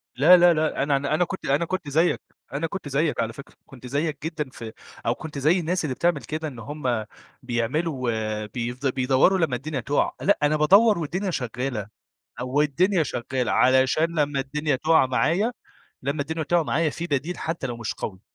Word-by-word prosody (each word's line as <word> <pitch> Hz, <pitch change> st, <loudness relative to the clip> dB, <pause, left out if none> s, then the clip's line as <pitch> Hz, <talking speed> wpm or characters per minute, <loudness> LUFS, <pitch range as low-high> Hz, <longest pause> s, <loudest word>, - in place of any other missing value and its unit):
لا، 165 Hz, +8 st, +7 dB
لا، 175 Hz, 0 st, +6 dB
لأ 155 Hz, -3 st, 0 dB
أنا 140 Hz, -1 st, +2 dB
أنا 140 Hz, +2 st, -2 dB
أنا 180 Hz, -, +2 dB
كنت 190 Hz, -, -7 dB
أنا 145 Hz, +5 st, +1 dB
كنت 175 Hz, -5 st, -4 dB
زَيَّك، 165 Hz, +5 st, +2 dB, 0.3 s
أنا 155 Hz, +4 st, -1 dB
كنت 190 Hz, -4 st, -6 dB
زِيَّك 150 Hz, +3 st, 0 dB
على 115 Hz, 0 st, -2 dB
فكرة، 140 Hz, -, -12 dB
كنت 125 Hz, -1 st, -12 dB
زَيَّك 145 Hz, +3 st, -1 dB
جدًا 155 Hz, -4 st, -3 dB
ف -, -, -10 dB, 0.4 s
أو 115 Hz, -, +1 dB
كنت 155 Hz, -2 st, -8 dB
زَي 155 Hz, +7 st, +3 dB
الناس 175 Hz, +1 st, -1 dB
اللي 130 Hz, -3 st, -2 dB
بتعمل 170 Hz, -4 st, +1 dB
كده 155 Hz, +1 st, -4 dB
إن 130 Hz, -6 st, -8 dB
هم 125 Hz, -4 st, -2 dB, 0.4 s
بيعملوا 125 Hz, +3 st, -1 dB, 0.4 s
بيف 120 Hz, +4 st, -5 dB
بيدوّروا 135 Hz, +7 st, +3 dB
لما 155 Hz, -7 st, +1 dB
الدنيا 140 Hz, +2 st, -4 dB
تقع، 140 Hz, +5 st, 0 dB
لأ 200 Hz, -, +3 dB
أنا 150 Hz, +1 st, +3 dB
بادوّر 200 Hz, +6 st, +5 dB
والدنيا 180 Hz, +5 st, -2 dB
شغّالة، 125 Hz, -, -3 dB, 0.5 s
أو 130 Hz, +4 st, +1 dB
الدنيا 170 Hz, +5 st, +2 dB
شغّالة 125 Hz, -2 st, -2 dB
علشان 130 Hz, +6 st, +3 dB
لمَّا 145 Hz, -1 st, +1 dB
الدنيا 145 Hz, +2 st, -1 dB
تقع 160 Hz, +1 st, +4 dB
معايّا، 170 Hz, -, +1 dB, 0.5 s
لمَّا 140 Hz, +2 st, -1 dB
الدنيا 160 Hz, +2 st, -3 dB
تقع 170 Hz, +2 st, +2 dB
معايّا 160 Hz, +1 st, +1 dB
في 170 Hz, +3 st, -5 dB
بَديل 150 Hz, +5 st, -2 dB
حتى 165 Hz, -4 st, -3 dB
لو 120 Hz, -2 st, -5 dB
مش 115 Hz, -, -3 dB
قوي. 95 Hz, -2 st, -6 dB
145 Hz, 185 wpm, -24 LUFS, 130-165 Hz, 0.5 s, لا